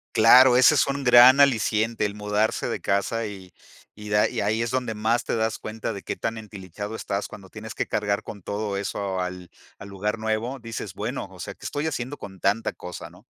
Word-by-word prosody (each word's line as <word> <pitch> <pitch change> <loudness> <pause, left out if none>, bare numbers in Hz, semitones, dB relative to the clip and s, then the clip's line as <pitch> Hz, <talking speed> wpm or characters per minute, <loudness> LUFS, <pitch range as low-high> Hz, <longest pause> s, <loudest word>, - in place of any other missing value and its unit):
Claro, 125 +3 +7
ese 130 +4 +6
es 140 - +3
un 140 -1 -3
gran 125 +3 +8
aliciente, 115 -4 +2
el 100 0 -3
mudarse 105 +1 0
de - - -3
casa 110 +3 0
y 95 -3 -10 0.4
y 105 0 -11
da, 105 0 +3
y - - -4
ahí 110 +3 0
es 115 +1 -2
donde 125 -3 -1
más 110 +3 0
te - - -1
das 110 -1 0
cuenta 110 +1 -5
de 100 - -7
qué - - -4
tan 115 0 -3
entilichado 105 0 -8
estás 100 -2 -3
cuando 95 -2 -12
tienes 110 0 -9
que - - -2
cargar 100 -1 -1
con 100 - -9
todo 100 +2 -3
eso 100 -1 -3
al 90 -1 -6 0.3
al 100 - -10
lugar 105 +3 -2
nuevo, 110 +4 -2
dices 115 -1 -6
bueno, - - -4
o - - -14
sea, - - -6
que - - -15
estoy 145 +2 -2
haciendo 140 -1 -4
con 95 -1 -10
tanta 105 +4 +1
cosa, 90 -2 -8
¿no? 90 +6 -19
110 Hz, 215 wpm, -24 LUFS, 100-115 Hz, 0.4 s, gran